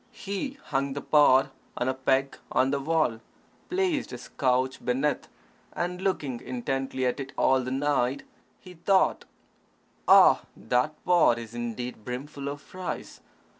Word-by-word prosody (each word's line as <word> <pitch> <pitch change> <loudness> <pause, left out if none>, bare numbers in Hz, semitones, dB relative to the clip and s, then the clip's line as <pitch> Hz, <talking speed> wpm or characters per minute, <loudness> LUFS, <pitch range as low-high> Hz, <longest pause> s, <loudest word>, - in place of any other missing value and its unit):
He 230 +8 -5
hung 135 0 -1
the 140 - -4
pot 135 -3 +5 0.3
on 125 - -1
a 130 - +1
peg 130 +1 +1 0.2
on 130 +1 +2
the 140 - 0
wall, 150 -6 +1 0.5
placed 365 -5 0
his - - -9
couch 130 -1 0
beneath, 135 +4 0 0.5
and 180 +1 -3
looking 145 -10 -1
intently 130 +1 -2
at 125 +3 0
it 135 0 -6
all 130 0 +3
the 125 - -4
night, 135 -1 0 0.4
he 180 -2 -13
thought, 185 +3 +2 0.8
"Ah, - - +7 0.2
that 125 +5 0
pot 175 -9 +5
is 115 -1 -8
indeed 120 -1 -5
brimful 140 +4 -6
of 145 +1 -7
rice. 185 0 -6
135 Hz, 140 wpm, -27 LUFS, 125-155 Hz, 0.8 s, Ah